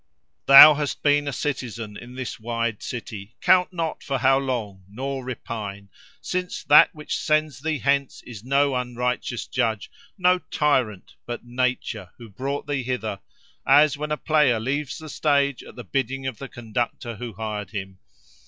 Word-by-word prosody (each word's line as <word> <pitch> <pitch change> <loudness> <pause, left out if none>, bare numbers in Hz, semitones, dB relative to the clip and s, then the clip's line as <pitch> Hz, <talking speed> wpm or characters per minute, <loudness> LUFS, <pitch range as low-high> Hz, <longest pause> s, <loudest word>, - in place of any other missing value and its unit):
"Thou 140 +2 +11
hast 145 -1 -3
been 145 0 +3
a - - -1
citizen 120 -6 -4
in 120 +3 -11
this 130 -2 -5
wide 115 -1 -2
city. 110 -2 -7
Count 180 0 +4
not 165 -3 -3
for 135 -2 -2
how 135 0 +3
long, 115 -8 -4
nor 135 +5 -4
repine; 105 -5 -6 0.3
since 180 0 -4
that 145 - +7
which 150 -1 -4
sends 155 -4 0
thee 155 0 -1
hence 140 -1 0
is 115 -4 -10
no 140 +2 +2
unrighteous 125 -1 -2
judge, 115 -5 -2 0.3
no 180 -1 +3
tyrant, 130 - -1
but 120 0 -6
Nature, 120 -5 -2
who 115 -2 -12
brought 135 +7 -4
thee 145 -2 -2
hither; 120 -5 -3 0.4
as 150 0 +5
when 150 +1 -5
a 150 - 0
player 150 -8 +2
leaves 135 +4 -3
the 160 - -10
stage 140 -3 +1
at - - -13
the 120 - -8
bidding 135 +4 -2
of 130 -5 -4
the 135 - -7
conductor 120 0 -4
who 120 0 -6
hired 105 -1 -5
him. 95 -3 -7
130 Hz, 160 wpm, -24 LUFS, 115-145 Hz, 0.4 s, Thou